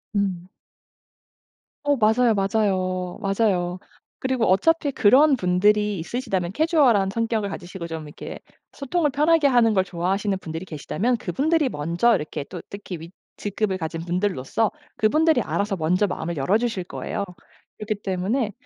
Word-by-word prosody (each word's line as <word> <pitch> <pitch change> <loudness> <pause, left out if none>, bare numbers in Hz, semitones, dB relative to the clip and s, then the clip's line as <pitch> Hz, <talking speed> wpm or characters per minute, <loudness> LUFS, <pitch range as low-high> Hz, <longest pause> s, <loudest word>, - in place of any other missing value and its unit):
음. 185 -3 -1 1.4
어 290 -1 +3
맞아요, 225 +1 +4
맞아요. 190 -3 0
맞아요. 195 -3 0 0.4
그리고 260 -3 0
어차피 285 - +2
그런 270 +8 +5
분들이 205 0 +2
있으시다면 190 - -3
캐주얼한 275 - +3
성격을 225 -1 -1
가지시고 175 -2 -7
좀 160 -2 -6
이렇게 150 - -8 0.3
소통을 295 +3 0
편하게 300 +2 +3
하는 240 -4 +4
걸 190 -2 +3
좋아하시는 190 +2 -1
분들이 160 -1 -6
계시다면 190 - -2
그분들이 290 - +1
먼저 170 +5 +1
이렇게 150 -4 -4
또 180 +2 -8
특히 200 -3 -7
윗 170 +2 -10 0.2
직급을 205 -1 -2
가진 165 -1 -4
분들로서 180 +2 -1 0.2
그분들이 310 +9 +3
알아서 200 0 -1
먼저 180 +4 +1
마음을 170 -3 -4
열어 180 +10 +2
주실 230 -5 -2
거예요. 200 - -4 0.5
그렇기 210 -1 -3
때문에 205 +5 -1
200 Hz, 355 characters per minute, -23 LUFS, 180-240 Hz, 1.4 s, 그런